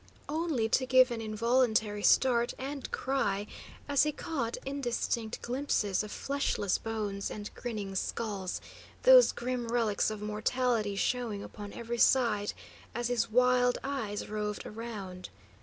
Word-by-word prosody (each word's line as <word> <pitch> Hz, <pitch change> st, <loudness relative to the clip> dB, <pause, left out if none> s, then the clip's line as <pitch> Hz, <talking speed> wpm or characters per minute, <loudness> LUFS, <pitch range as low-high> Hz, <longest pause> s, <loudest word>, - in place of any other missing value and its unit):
Only 305 Hz, -7 st, 0 dB
to 260 Hz, +3 st, +1 dB
give 255 Hz, -1 st, +6 dB
an 230 Hz, -1 st, -3 dB
involuntary 220 Hz, -1 st, +1 dB
start 240 Hz, +1 st, +4 dB
and 275 Hz, +1 st, -5 dB
cry 205 Hz, -7 st, 0 dB, 0.4 s
as 285 Hz, -1 st, +3 dB
he 300 Hz, -, +3 dB
caught 275 Hz, -7 st, -3 dB
indistinct 240 Hz, -4 st, -2 dB
glimpses 240 Hz, -6 st, 0 dB
of 210 Hz, -1 st, -6 dB
fleshless 275 Hz, -8 st, -1 dB
bones 210 Hz, -3 st, -3 dB
and 210 Hz, 0 st, -7 dB
grinning 210 Hz, -5 st, -5 dB
skulls, 195 Hz, -1 st, -3 dB, 0.4 s
those -, -, +8 dB
grim 245 Hz, -1 st, -3 dB
relics 230 Hz, -4 st, +1 dB
of 215 Hz, -1 st, -5 dB
mortality 215 Hz, 0 st, 0 dB
showing 220 Hz, -1 st, -1 dB
upon 205 Hz, -1 st, -8 dB
every 235 Hz, 0 st, -5 dB
side 225 Hz, -7 st, +3 dB, 0.4 s
as 240 Hz, +1 st, -1 dB
his 240 Hz, -2 st, +1 dB
wild 250 Hz, +1 st, +4 dB
eyes 245 Hz, -7 st, -3 dB
roved 210 Hz, -1 st, -3 dB
around. 210 Hz, -5 st, -7 dB
230 Hz, 130 wpm, -31 LUFS, 210-255 Hz, 0.4 s, those